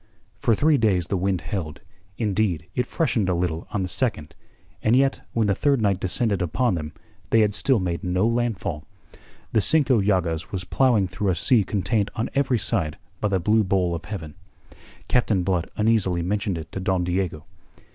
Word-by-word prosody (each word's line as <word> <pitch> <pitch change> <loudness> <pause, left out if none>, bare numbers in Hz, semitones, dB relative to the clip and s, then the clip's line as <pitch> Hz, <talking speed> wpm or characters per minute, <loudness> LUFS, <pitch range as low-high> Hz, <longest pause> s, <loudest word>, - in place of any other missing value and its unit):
For 115 - +3
three 150 +4 +3
days 95 -6 +2
the 95 - -2
wind 95 -1 0
held, 75 -1 -5 0.4
indeed 100 -6 0
it 125 - -1
freshened 115 - 0
a 90 - +2
little 85 -2 -2
on 100 - -2
the - - -2
second, 90 - -2 0.5
and 110 +2 +3
yet 135 +1 +2
when 115 -2 +2
the 100 - +2
third 140 +6 +2
night 100 -4 +1
descended 100 +2 -1
upon 110 +8 +1
them 80 -3 -4 0.4
they 115 - +4
had 105 -1 +2
still 110 +7 +2
made 90 0 -2
no 90 +2 +1
landfall. 115 -9 -1 0.7
The 110 - +3
Cinco 130 +1 +3
Llagas 90 -5 0
was 95 -2 -3
ploughing 115 -1 +2
through 95 +3 -2
a 90 - +2
sea 115 - +3
contained 100 +2 0
on 110 - -2
every 135 -3 +2
side 80 -6 -1 0.2
by 105 - 0
the 95 -2 +1
blue 110 +5 +3
bowl 90 -3 +1
of 85 - -5
heaven. 80 -8 -6 0.7
Captain 110 -7 +2
Blood 90 -2 -1
uneasily 105 -6 +2
mentioned 100 0 -1
it 80 -1 -8
to - - -5
Don 95 -1 0
Diego. 90 -3 -2
100 Hz, 185 wpm, -24 LUFS, 90-110 Hz, 0.7 s, they